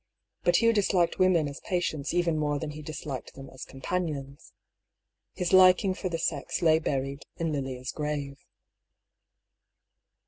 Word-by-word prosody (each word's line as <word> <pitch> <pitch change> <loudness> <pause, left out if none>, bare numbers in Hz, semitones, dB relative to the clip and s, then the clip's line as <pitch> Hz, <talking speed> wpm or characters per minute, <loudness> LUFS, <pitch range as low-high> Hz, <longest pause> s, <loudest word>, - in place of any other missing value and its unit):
But 175 - +3
Hugh 230 +4 +4
disliked 190 -5 +2
women 180 -5 +4
as 140 0 -7
patients 160 -5 -2
even 175 -2 +1
more 150 -1 0
than 150 +1 -4
he 155 +1 -8
disliked 150 -3 -6
them 135 0 -10
as 130 - -9
companions. 140 -1 -4 0.8
His 180 0 -2
liking 185 +1 +6
for 185 0 -4
the 165 - -2
sex 160 -1 -2
lay 160 -1 +5
buried 140 -2 -3
in 165 -2 -1
Lilia's 130 -3 -3
grave. 145 -2 -4
155 Hz, 140 wpm, -28 LUFS, 140-175 Hz, 0.8 s, liking